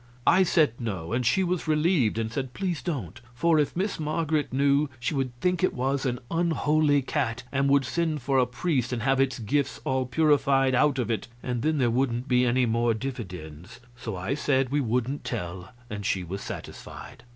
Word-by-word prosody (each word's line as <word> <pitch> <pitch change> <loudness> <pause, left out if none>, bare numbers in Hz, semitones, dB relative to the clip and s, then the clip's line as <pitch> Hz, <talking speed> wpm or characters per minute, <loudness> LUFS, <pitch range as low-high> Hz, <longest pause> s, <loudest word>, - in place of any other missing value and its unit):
I 185 - +5
said 160 -8 +3
no, 100 -5 -4
and 125 +1 +1
she 125 +11 +3
was 180 -2 -1
relieved, 155 - +2
and 110 -1 -2
said 130 -2 -4
please 180 -7 -2
don't; 125 - -4
for 160 +5 +3
if 145 - 0
Miss 195 0 -1
Marget 155 -1 -1
knew, 140 +2 +2
she 125 - -2
would 135 -3 -1
think 180 +2 0
it 185 - +2
was 135 +2 0
an 125 -1 -1
unholy 155 -4 +2
cat 125 -4 -2
and 140 0 +1
would 140 -1 +4
send 155 +1 -1
for 135 0 +2
a 125 - +3
priest 125 -1 -1
and 120 -3 -2
have 135 0 +3
its 130 -2 +1
gifts 130 +2 -1
all 130 -1 0
purified 135 -1 +3
out 140 +2 +3
of 120 -3 -1
it, 110 - -2 0.2
and 125 -2 -2
then 155 +2 +1
there 125 -4 +2
wouldn't 125 0 0
be 125 -1 +3
any 125 +1 +3
more 115 0 +1
dividends. 90 - -7 0.2
So 115 -4 -6
I 95 +7 -2
said 135 -3 +1
we 145 0 +2
wouldn't 125 +3 -1
tell, 90 -5 -5 0.2
and 105 -2 -6
she 95 -1 0
was 95 +3 -6
satisfied. - - -9
130 Hz, 195 wpm, -26 LUFS, 120-150 Hz, 0.2 s, I